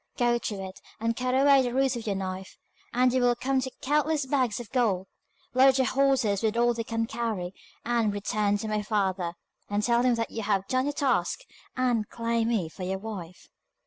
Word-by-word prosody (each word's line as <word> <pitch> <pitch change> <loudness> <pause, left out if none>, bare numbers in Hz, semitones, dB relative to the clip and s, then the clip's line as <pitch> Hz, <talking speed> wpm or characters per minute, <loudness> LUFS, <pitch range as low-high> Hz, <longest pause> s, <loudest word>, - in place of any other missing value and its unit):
Go 240 -1 +2
to 215 - -3
it, 190 0 -10 0.2
and 230 +1 0
cut 255 +1 -1
away 275 0 +6
the 245 -1 -2
roots 265 -1 +2
with 230 -2 -6
your 200 - 0
knife, 190 0 -5 0.3
and 250 +1 +3
you 260 - +2
will 245 0 +3
come 265 +2 0
to 260 - -3
countless 300 +1 +1
bags 260 -5 0
of 240 - -9
gold. 215 -8 +1 0.5
Load 265 +1 +6
the 260 -1 +3
horses 255 -7 +2
with 220 0 0
all 240 0 +3
they 230 0 -3
can 225 0 -1
carry, 220 -6 -3 0.3
and 235 -3 +1
return 205 0 0
to 220 - -5
my 215 0 0
father, 190 -5 -1 0.4
and 205 +1 0
tell 235 +1 +3
him 250 -1 +3
that 230 0 -2
you 225 - -4
have 200 -2 0
done 255 +1 +1
your 290 - -1
task, 285 - 0 0.4
and 240 -4 +1
can - - -18
claim 230 -1 +1
me 220 -8 0
for 160 - -12
your 190 +1 -2
wife. 190 -4 -8
230 Hz, 210 wpm, -27 LUFS, 205-255 Hz, 0.5 s, away